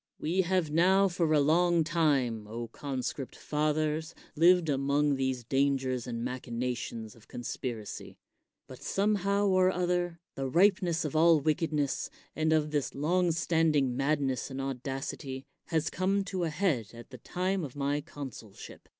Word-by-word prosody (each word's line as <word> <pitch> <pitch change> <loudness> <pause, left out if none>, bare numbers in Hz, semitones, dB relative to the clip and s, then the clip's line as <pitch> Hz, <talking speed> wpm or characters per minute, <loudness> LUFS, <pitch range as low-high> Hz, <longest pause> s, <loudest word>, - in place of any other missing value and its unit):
We 175 +5 +1
have 180 -4 0
now 190 +5 +4
for 175 -3 0
a 155 - +5
long 170 +3 +3
time, 140 -10 +1
O 115 +2 -6
conscript 135 +1 -4
fathers, 155 +1 -1 0.2
lived 175 +1 +5
among 140 +1 +2
these 130 -2 -1
dangers 135 -1 0
and 115 -1 -3
machina 125 0 -3
tions 115 -2 -7
of 115 - -20
conspiracy; 120 -3 -6 0.5
but - - -12
somehow 200 0 +1
or 185 -1 +4
other, 175 -2 -1
the 135 -1 -3
ripeness 175 0 +3
of 150 - -4
all 165 0 +6
wickedness, 150 -1 0 0.3
and 160 0 +1
of 155 -1 +2
this 145 -3 -1
long 170 +5 +2
standing 160 -6 +2
madness 135 -1 0
and 135 0 -6
audacity, 135 0 -4 0.2
has 160 -2 0
come 195 +2 +1
to 185 -2 -2
a - - -1
head 150 - -1
at 120 +3 -12
the 125 - -10
time 185 - -1
of 140 -3 -7
my 145 +1 0
consulship. 135 -9 -10
150 Hz, 150 wpm, -30 LUFS, 130-175 Hz, 0.5 s, all